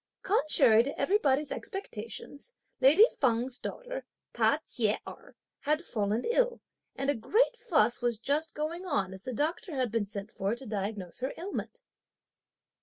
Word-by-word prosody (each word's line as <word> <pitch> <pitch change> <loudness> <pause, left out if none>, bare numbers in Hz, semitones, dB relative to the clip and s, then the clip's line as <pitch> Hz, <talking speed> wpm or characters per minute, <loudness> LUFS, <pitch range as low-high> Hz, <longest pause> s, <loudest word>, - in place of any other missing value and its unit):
Contrary 295 - +5
to 275 +4 -4
everybody's 295 -8 +2
expectations, 285 - -6 0.2
lady 295 +11 +8
Feng's 245 0 +1
daughter, - - -5 0.3
Ta - - +3
Chieh 220 -3 0
Erh, - - -11 0.2
had 305 +3 0
fallen 215 +1 -1
ill, 485 +1 +2 0.4
and 275 +1 0
a - - -2
great 445 - +2
fuss 240 - +2
was 240 -2 +1
just 290 +8 -1
going 320 +4 -3
on 195 - 0
as 190 0 -10
the 255 - -3
doctor 315 - -2
had 255 -4 0
been 225 -3 0
sent 200 0 -5
for 200 +3 -1
to 265 +2 -9
diagnose 200 -4 -4
her 260 +2 -3
ailment. 405 +6 -5
270 Hz, 150 wpm, -30 LUFS, 220-335 Hz, 0.4 s, lady